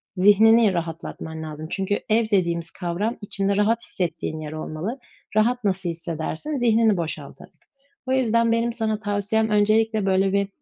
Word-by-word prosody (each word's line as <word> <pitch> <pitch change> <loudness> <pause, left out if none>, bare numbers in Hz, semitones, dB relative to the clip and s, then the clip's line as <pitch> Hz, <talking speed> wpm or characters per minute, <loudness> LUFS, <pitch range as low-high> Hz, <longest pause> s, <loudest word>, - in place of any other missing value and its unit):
zihnini 210 +2 +5
rahatlatman 165 -1 -5
lazım. 155 0 -7
Çünkü 195 +1 -1
ev 220 0 +2
dediğimiz 170 -5 +1
kavram 190 +6 -3
içinde 200 -1 0
rahat 225 +3 +2
hissettiğin 160 -3 -3
yer 155 -1 -6
olmalı. 155 - -5 0.4
Rahat 240 +3 +2
nasıl 190 -3 0
hissedersin? 165 - -4
Zihnini 225 -4 +3
boşaltarak. 165 -2 -5 0.5
O - - -1
yüzden 230 -3 +2
benim 230 +1 +1
sana 220 -2 -1
tavsiyem 210 +1 0
öncelikle, 215 0 +2
böyle, 190 0 +2
bir 200 0 +1
205 Hz, 140 wpm, -23 LUFS, 170-225 Hz, 0.5 s, zihnini